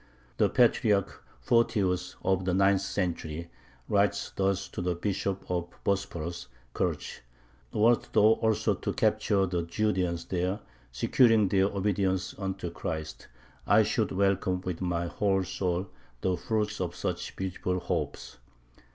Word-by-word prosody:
The -, -, +3 dB
Patriarch 110 Hz, -5 st, +2 dB, 0.2 s
Photius, 95 Hz, -, +1 dB
of 95 Hz, -1 st, +1 dB
the 90 Hz, -1 st, +1 dB
ninth 95 Hz, 0 st, +4 dB
century, 85 Hz, -4 st, -3 dB, 0.4 s
writes 100 Hz, 0 st, +1 dB
thus 100 Hz, 0 st, 0 dB
to -, -, -5 dB
the 90 Hz, -1 st, 0 dB
Bishop 100 Hz, +1 st, -2 dB
of 90 Hz, -1 st, -1 dB, 0.2 s
Bosporus 85 Hz, -5 st, -2 dB, 0.3 s
(Kerch): -, -, -2 dB, 0.5 s
"Wert 115 Hz, +3 st, +3 dB
thou 105 Hz, +1 st, +6 dB
also 110 Hz, -1 st, +2 dB
to -, -, -3 dB
capture 100 Hz, -2 st, +2 dB
the 90 Hz, -2 st, -1 dB
Judeans 90 Hz, -1 st, -1 dB
there, 90 Hz, +3 st, -1 dB, 0.3 s
securing 110 Hz, -, +4 dB
their 95 Hz, 0 st, +3 dB
obedience 100 Hz, -1 st, 0 dB
unto 95 Hz, -3 st, -3 dB
Christ, 80 Hz, -2 st, -5 dB, 0.4 s
I -, -, +6 dB
should -, -, 0 dB
welcome 95 Hz, -1 st, +1 dB
with 90 Hz, -2 st, -4 dB
my 85 Hz, -1 st, -1 dB
whole 95 Hz, +2 st, +1 dB
soul 95 Hz, 0 st, -2 dB, 0.3 s
the 95 Hz, -1 st, +1 dB
fruits 105 Hz, +3 st, -2 dB
of 90 Hz, -1 st, -3 dB
such -, -, -4 dB
beautiful 90 Hz, -1 st, -2 dB
hopes." -, -, -4 dB
95 Hz, 130 wpm, -29 LUFS, 90-100 Hz, 0.5 s, thou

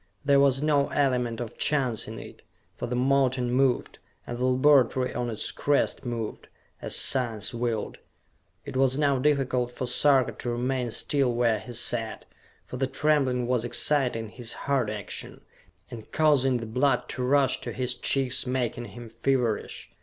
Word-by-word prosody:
There 140 Hz, -1 st, +5 dB
was 140 Hz, 0 st, +3 dB
no 145 Hz, -2 st, +2 dB
element 125 Hz, -5 st, 0 dB
of 120 Hz, -2 st, -7 dB
chance 130 Hz, -7 st, 0 dB
in -, -, -7 dB
it, -, -, -11 dB, 0.3 s
for -, -, -5 dB
the 125 Hz, -, -3 dB
mountain 130 Hz, -1 st, +1 dB
moved, 130 Hz, -1 st, +1 dB, 0.3 s
and 120 Hz, -, -6 dB
the 125 Hz, -, 0 dB
laboratory 130 Hz, -1 st, +3 dB
on 120 Hz, 0 st, -2 dB
its 110 Hz, -, -4 dB
crest 145 Hz, -1 st, 0 dB
moved, 115 Hz, -3 st, -5 dB, 0.3 s
as -, -, -1 dB
science 115 Hz, -6 st, +1 dB
willed. 115 Hz, -2 st, -3 dB, 0.7 s
It -, -, -8 dB
was 130 Hz, 0 st, +2 dB
now 140 Hz, -3 st, +2 dB
difficult 130 Hz, -3 st, +1 dB
for 125 Hz, -, -4 dB
Sarka 130 Hz, +1 st, +3 dB
to 120 Hz, -, -3 dB
remain 125 Hz, +1 st, -1 dB
still 135 Hz, +2 st, +1 dB
where 120 Hz, -2 st, +1 dB
he 120 Hz, -, -10 dB
sat, 115 Hz, -1 st, 0 dB, 0.4 s
for 125 Hz, -, -7 dB
the 135 Hz, +1 st, 0 dB
trembling 135 Hz, -3 st, +1 dB
was 125 Hz, -1 st, 0 dB
exciting 120 Hz, -3 st, 0 dB
his 120 Hz, +1 st, -7 dB
heart 135 Hz, -6 st, +1 dB
action, 105 Hz, -3 st, -6 dB, 0.5 s
and 115 Hz, -3 st, -10 dB
causing 140 Hz, -5 st, +3 dB
the 115 Hz, -, -5 dB
blood 130 Hz, +5 st, +1 dB
to 130 Hz, -, -4 dB
rush 135 Hz, 0 st, +2 dB
to -, -, -5 dB
his 125 Hz, -1 st, -1 dB
cheeks, 130 Hz, +1 st, +1 dB
making 125 Hz, -2 st, -2 dB
him 120 Hz, -1 st, -11 dB
feverish. 125 Hz, -5 st, -1 dB
125 Hz, 160 wpm, -26 LUFS, 120-135 Hz, 0.7 s, There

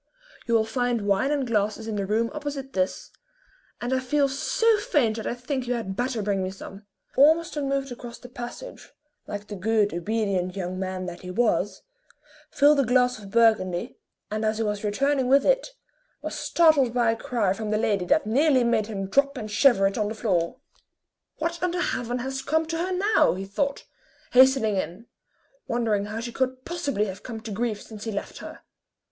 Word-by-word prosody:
You 235 Hz, -, +2 dB
will 220 Hz, -1 st, +3 dB
find 240 Hz, -1 st, -1 dB
wine 200 Hz, +7 st, +2 dB
and 290 Hz, -2 st, 0 dB
glasses 215 Hz, -1 st, -1 dB
in 220 Hz, -, -3 dB
the 200 Hz, -1 st, -2 dB
room 225 Hz, +3 st, +1 dB
opposite 285 Hz, -3 st, -5 dB
this, 185 Hz, 0 st, -2 dB, 0.7 s
and 245 Hz, +2 st, -2 dB
I 260 Hz, -, +2 dB
feel 275 Hz, +2 st, +1 dB
so 420 Hz, -, +2 dB
faint 245 Hz, -, +1 dB
that 220 Hz, -, -4 dB
I -, -, -2 dB
think 250 Hz, +1 st, -4 dB
you 245 Hz, -, 0 dB
had 200 Hz, -5 st, -4 dB
better 245 Hz, -2 st, -1 dB
bring 200 Hz, -1 st, 0 dB
me 185 Hz, -, -2 dB
some." 195 Hz, +1 st, -10 dB, 0.3 s
Ormiston 300 Hz, 0 st, +3 dB
moved 275 Hz, -1 st, -1 dB
across 240 Hz, -1 st, -8 dB
the 250 Hz, -, -12 dB
passage, 245 Hz, -, -8 dB, 0.4 s
like 205 Hz, 0 st, -5 dB
the 210 Hz, -, -7 dB
good, 210 Hz, +1 st, +1 dB
obedient 190 Hz, -1 st, -1 dB
young 185 Hz, -1 st, -4 dB
man 185 Hz, -1 st, -3 dB
that 175 Hz, -1 st, -7 dB
he 180 Hz, -, -8 dB
was, 195 Hz, -2 st, 0 dB, 0.7 s
filled 290 Hz, 0 st, +4 dB
a -, -, +5 dB
glass 250 Hz, 0 st, +2 dB
of 200 Hz, -2 st, -11 dB
Burgundy, 215 Hz, -5 st, +2 dB, 0.3 s
and 215 Hz, +1 st, -2 dB
as 215 Hz, 0 st, +1 dB
he 225 Hz, -, 0 dB
was 210 Hz, -1 st, -2 dB
returning 265 Hz, +5 st, +1 dB
with 275 Hz, +2 st, +4 dB
it, -, -, +2 dB, 0.5 s
was -, -, -4 dB
startled 295 Hz, -8 st, +3 dB
by 235 Hz, -2 st, +3 dB
a -, -, -1 dB
cry 225 Hz, -5 st, 0 dB
from 215 Hz, +1 st, -5 dB
the 215 Hz, -, +1 dB
lady 205 Hz, -4 st, 0 dB
that 295 Hz, -, +2 dB
nearly 260 Hz, +3 st, +3 dB
made 230 Hz, -3 st, +1 dB
him 195 Hz, -3 st, -4 dB
drop 280 Hz, +6 st, +2 dB
and 215 Hz, -1 st, -6 dB
shiver 210 Hz, -3 st, +4 dB
it 195 Hz, +2 st, 0 dB
on 210 Hz, -, +1 dB
the 220 Hz, -, -4 dB
floor. 180 Hz, -7 st, 0 dB, 0.8 s
"What 335 Hz, +2 st, -3 dB
under 360 Hz, 0 st, 0 dB
heaven 245 Hz, -8 st, -1 dB
has 265 Hz, +2 st, -3 dB
come 315 Hz, +4 st, +1 dB
to 325 Hz, +1 st, -3 dB
her 365 Hz, +2 st, -1 dB
now?" 395 Hz, -, +3 dB
he 190 Hz, +1 st, -5 dB
thought, 280 Hz, +8 st, -2 dB, 0.5 s
hastening 255 Hz, -5 st, +5 dB
in, 185 Hz, +4 st, -4 dB, 0.6 s
wondering 225 Hz, -4 st, 0 dB
how 215 Hz, +2 st, -5 dB
she 240 Hz, +1 st, -5 dB
could 260 Hz, +1 st, -2 dB
possibly 285 Hz, -, -1 dB
have 190 Hz, -1 st, -7 dB
come 225 Hz, -1 st, -7 dB
to 220 Hz, -1 st, -7 dB
grief 215 Hz, 0 st, -2 dB
since 215 Hz, -1 st, -10 dB
he 225 Hz, -, -2 dB
left 200 Hz, -, -5 dB
her. -, -, -9 dB
230 Hz, 195 wpm, -25 LUFS, 205-270 Hz, 0.8 s, a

